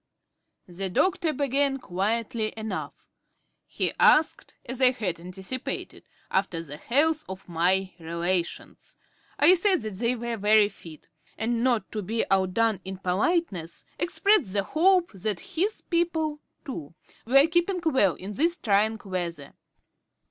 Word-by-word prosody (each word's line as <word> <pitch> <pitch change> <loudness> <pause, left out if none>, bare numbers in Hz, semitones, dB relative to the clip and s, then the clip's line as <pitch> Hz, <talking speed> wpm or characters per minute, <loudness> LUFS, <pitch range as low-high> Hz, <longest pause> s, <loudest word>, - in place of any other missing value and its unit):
The 190 +2 -4
doctor 355 - +1
began 280 -1 +1
quietly 215 +1 -2
enough. 220 -3 -5 0.6
He - - 0
asked, 310 0 +3
as 255 +1 -5
I 255 - +8
had 185 -9 -3
anticipated, 190 +8 -6 0.2
after 185 -4 0
the 145 -2 -8
health 310 - +1
of 190 0 -8
my 185 +3 +1
relations. 170 +2 -3 0.4
I 320 +5 +7
said 370 - +2
that 215 -2 -5
they 235 +3 +1
were 235 -1 -4
very 210 0 +4
fit; 165 -6 -14 0.3
and 230 +1 -1
not 235 -7 +1
to 215 - -3
be 225 +4 -1
outdone 195 +2 +2
in 190 0 -6
politeness, 190 - -1
expressed 345 - +2
the 200 -1 +1
hope 355 - +3
that 200 +1 -3
his 390 +6 0
people, 325 -3 -1 0.3
too, 165 - -7 0.3
were 275 +3 +6
keeping 345 +3 +1
well 260 - +3
in 195 +3 -8
this 335 - +1
trying 215 0 +1
weather. 170 -6 -4
220 Hz, 135 wpm, -26 LUFS, 185-295 Hz, 0.6 s, I